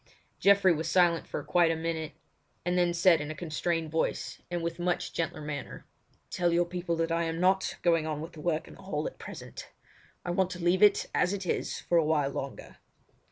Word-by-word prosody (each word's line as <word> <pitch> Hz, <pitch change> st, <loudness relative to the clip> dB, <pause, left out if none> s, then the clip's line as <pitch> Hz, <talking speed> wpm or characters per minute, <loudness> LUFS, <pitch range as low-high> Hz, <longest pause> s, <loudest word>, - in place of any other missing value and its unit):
Geoffrey 200 Hz, -2 st, +5 dB
was 160 Hz, +1 st, -2 dB
silent 175 Hz, -2 st, +3 dB
for -, -, -4 dB
quite 175 Hz, -2 st, +3 dB
a 165 Hz, -, +1 dB
minute, 160 Hz, -1 st, -3 dB, 0.5 s
and 175 Hz, 0 st, +1 dB
then 175 Hz, -1 st, +3 dB
said 170 Hz, -1 st, +4 dB
in 150 Hz, -, -5 dB
a 155 Hz, -, -5 dB
constrained 165 Hz, 0 st, -2 dB
voice 160 Hz, -, -2 dB
and 175 Hz, -1 st, -3 dB
with 170 Hz, +1 st, -3 dB
much 175 Hz, 0 st, -1 dB
gentler 165 Hz, -1 st, -2 dB
manner: 150 Hz, -2 st, -6 dB, 0.5 s
"Tell 175 Hz, -1 st, +1 dB
your 175 Hz, +1 st, +3 dB
people 175 Hz, -1 st, -3 dB
that 165 Hz, 0 st, -1 dB
I 165 Hz, 0 st, +1 dB
am 165 Hz, 0 st, -3 dB
not 190 Hz, +1 st, +2 dB
going 165 Hz, -2 st, +3 dB
on 155 Hz, -1 st, -2 dB
with 160 Hz, +2 st, -6 dB
the 155 Hz, -, -11 dB
work 160 Hz, -1 st, -1 dB
in -, -, -12 dB
the -, -, -15 dB
hall -, -, -3 dB
at -, -, -6 dB
present. -, -, -9 dB, 0.6 s
I 175 Hz, -, -1 dB
want 185 Hz, +1 st, +1 dB
to 180 Hz, -, -8 dB
leave 175 Hz, +2 st, +2 dB
it 210 Hz, -1 st, +5 dB
as 180 Hz, +2 st, +2 dB
it 195 Hz, -2 st, -4 dB
is -, -, -2 dB
for 170 Hz, -, +2 dB
a -, -, +3 dB
while 150 Hz, -3 st, +1 dB
longer." 135 Hz, 0 st, -7 dB
170 Hz, 215 wpm, -29 LUFS, 160-175 Hz, 0.6 s, Geoffrey